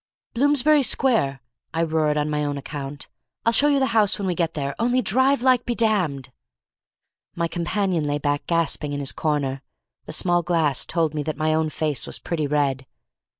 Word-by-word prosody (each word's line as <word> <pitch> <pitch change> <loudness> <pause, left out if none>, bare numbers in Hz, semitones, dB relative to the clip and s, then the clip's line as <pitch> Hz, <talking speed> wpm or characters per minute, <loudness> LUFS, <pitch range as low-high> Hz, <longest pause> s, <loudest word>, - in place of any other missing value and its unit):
"Bloomsbury 290 +3 +4
Square," 220 - +1 0.3
I 165 - +1
roared 155 -2 +1
on 150 0 0
my 150 0 -1
own 145 -1 -2
account, 140 0 -7 0.4
"I'll 230 - +3
show 290 - +5
you 285 -1 +3
the 270 - +2
house 215 -3 +3
when 200 - -4
we 180 - +1
get 165 -2 -2
there, 140 -2 -2
only 245 +2 +2
drive 260 +3 +2
like 255 -2 +4
be 240 - -2
damned!" 180 - 0 1.0
My 170 0 0
companion 175 -1 -1
lay 145 0 0
back 145 0 -2
gasping 160 -3 0
in 145 - -3
his 140 -2 -2
corner. 140 -3 -2 0.4
The - - -7
small 175 -1 +1
glass 160 -5 +1
told 165 -3 0
me 150 - -2
that 155 +1 -4
my 155 0 +1
own 160 0 +1
face 150 -5 -2
was - - -1
pretty 155 -4 -3
red. 140 -3 0
160 Hz, 190 wpm, -23 LUFS, 145-215 Hz, 1.0 s, show